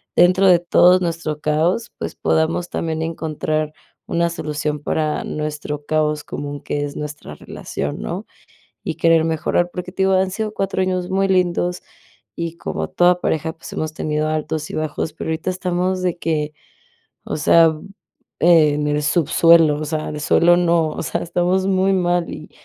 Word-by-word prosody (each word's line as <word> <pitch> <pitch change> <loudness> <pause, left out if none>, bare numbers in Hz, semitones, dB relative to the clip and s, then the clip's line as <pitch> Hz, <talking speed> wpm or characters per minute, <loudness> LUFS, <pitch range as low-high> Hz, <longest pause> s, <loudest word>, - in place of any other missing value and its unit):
dentro 185 +2 +5
de 180 -2 +7
todos 180 +1 +5
nuestro 165 -3 -2
caos, 165 +9 0
pues - - -5
podamos 165 +2 0
también 160 -1 -3
encontrar 155 -1 -2 0.4
una 170 0 +1
solución 150 -2 -3
para 155 +1 -1
nuestro 150 -1 -4
caos 150 -1 0
común 145 0 -6
que 145 - -3
es 145 - -7
nuestra 150 - -7
nuestra - - -12
relación, 70 -4 -5
¿no?, - - -4 0.6
y - - -3
querer 165 -1 +4
mejorar, 165 +2 0
porque 180 0 -6
te 190 - -1
digo, 190 - +3
han 190 0 +2
sido 215 +1 -3
4 195 -2 -1
años 185 -1 -1
muy 195 +1 +1
lindos 180 -1 +1 0.6
y 170 0 -4
como - - -4
toda 180 0 +3
pareja, 160 -1 -1
pues 165 - -11
hemos 155 0 -3
tenido 155 0 -1
altos 155 0 -2
y - - -6
bajos, 155 0 -3
pero 160 - -6
ahorita 160 +3 -3
estamos 185 0 -1
de 175 -1 -1
que, 155 -3 -1 0.7
o - - -3
sea, 160 +1 +5 0.6
en 150 -3 +4
el 150 0 0
subsuelo, 165 0 +4
o - - -2
sea, 155 0 -3
de 150 - -5
suelo 175 +3 +4
no, 170 -2 +2
o - - -5
sea, - - -2
estamos 180 +2 0
muy 190 0 +2
mal 175 -2 +1
y 155 - -9
165 Hz, 170 wpm, -20 LUFS, 150-180 Hz, 0.7 s, de